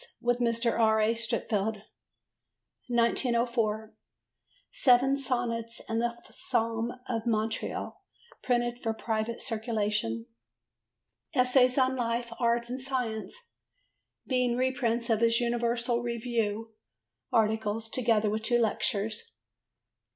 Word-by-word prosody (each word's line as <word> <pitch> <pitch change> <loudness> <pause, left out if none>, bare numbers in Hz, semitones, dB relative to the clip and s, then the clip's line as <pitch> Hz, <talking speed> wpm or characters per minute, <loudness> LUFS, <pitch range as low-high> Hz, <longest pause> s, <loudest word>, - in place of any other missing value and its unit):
with 240 0 +1
Mr. 235 0 +1
R. 220 -1 +4
A. 215 +1 +3
Streatfeild. 220 -2 -2 1.0
1904. 235 -2 +1 0.8
Seven 270 - +4
Sonnets 240 -4 -2
and 225 0 0
A 235 0 -1 0.2
Psalm 230 +1 -1 0.2
of 230 -1 -2
Montreal 220 -1 -2 0.4
printed 240 -1 0
for 225 -1 -1
private 225 +1 -2
circulation. 210 - -1 1.1
Essays 250 0 +4
on 260 0 +3
Life, 235 -1 -2
Art 235 0 +1
and 255 +2 -4
Science, 260 - -4 0.7
being 250 -2 +1
reprints 245 -2 0
of 220 - +3
his 230 0 +4
Universal 235 0 0
Review 230 -2 -2 0.6
articles, 220 0 +1
together 225 -3 +2
with 215 +1 -1
two 240 +2 +2
lectures. 215 - -1
235 Hz, 100 wpm, -29 LUFS, 220-245 Hz, 1.1 s, R